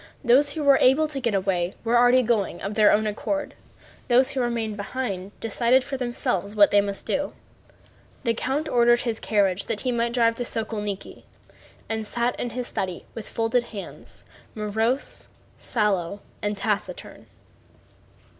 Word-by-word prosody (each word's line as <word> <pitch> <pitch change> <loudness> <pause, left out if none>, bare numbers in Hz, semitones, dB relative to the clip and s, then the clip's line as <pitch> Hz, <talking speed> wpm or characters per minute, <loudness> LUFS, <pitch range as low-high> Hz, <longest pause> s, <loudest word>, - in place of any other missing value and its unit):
Those 275 +4 +4
who 315 - -3
were 280 -1 +6
able 280 +5 +5
to 290 -3 -4
get 235 -5 0
away 185 -2 0
were 240 +1 +4
going 220 -4 0
of 195 +2 -4
their 210 -1 +5
own 215 +1 +3
accord, 290 +8 -2 0.5
those 255 +1 +4
who 265 - -1
remained 230 -3 -1
behind 200 -2 -4
decided 235 +3 +2
for 275 +1 -5
themselves 240 -5 -2
what 205 -1 +6
they 205 - +5
must 200 -1 -3
do. 290 +1 -1 0.9
The 230 -3 +2
count 270 +6 -2
ordered 240 -1 +4
his 230 -2 -2
carriage 200 -3 +1
that 220 -2 -3
he 255 - 0
might 235 0 0
drive 230 -2 +3
to 245 - -1
Sokólniki, 210 -4 -4 0.7
and 220 -1 -3
sat 240 +2 0
in 245 - -2
his 250 +1 -4
study 185 -6 -3
with 225 - -8
folded 230 +2 0
hands, 210 -4 -9 0.3
morose, 220 +5 -1 0.3
sallow, 200 -4 -1 0.2
and 205 0 -2
taciturn. 210 - -3
230 Hz, 155 wpm, -24 LUFS, 205-250 Hz, 0.9 s, were